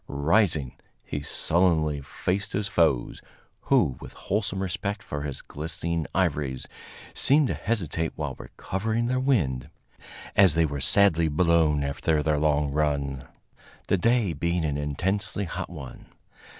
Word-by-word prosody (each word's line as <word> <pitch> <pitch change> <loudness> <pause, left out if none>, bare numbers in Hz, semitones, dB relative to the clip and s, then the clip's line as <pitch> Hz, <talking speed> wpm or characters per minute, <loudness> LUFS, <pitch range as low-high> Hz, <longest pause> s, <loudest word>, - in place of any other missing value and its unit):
Rising, 75 - +1 0.3
he 75 - -4
sullenly 80 -2 +1
faced 90 +8 -3
his 100 0 -1
foes, 80 -10 +1 0.4
who, 65 -3 +3
with - - -10
wholesome 95 -1 -2
respect 100 +2 -3
for 75 - -5
his 70 -2 -5
glistening 80 +2 -3
ivories, 75 -8 0 0.5
seemed 145 0 +4
to - - 0
hesitate 80 -7 -2
while 75 -3 -3
recovering 110 +5 -3
their 130 +1 0
wind, 80 - 0 0.7
as 95 -6 +6
they 80 0 +4
were 70 -2 -4
sadly 85 0 +4
blown 80 -2 +2
after 75 +2 0
their 75 -1 +1
long 75 -1 +1
run, 70 -3 -1 0.6
the 100 - +3
day 115 -4 +2
being 85 +2 -1
an 75 -2 -1
intensely 95 +8 -2
hot 85 - -5
one. 75 -7 -10
80 Hz, 135 wpm, -26 LUFS, 75-95 Hz, 0.7 s, as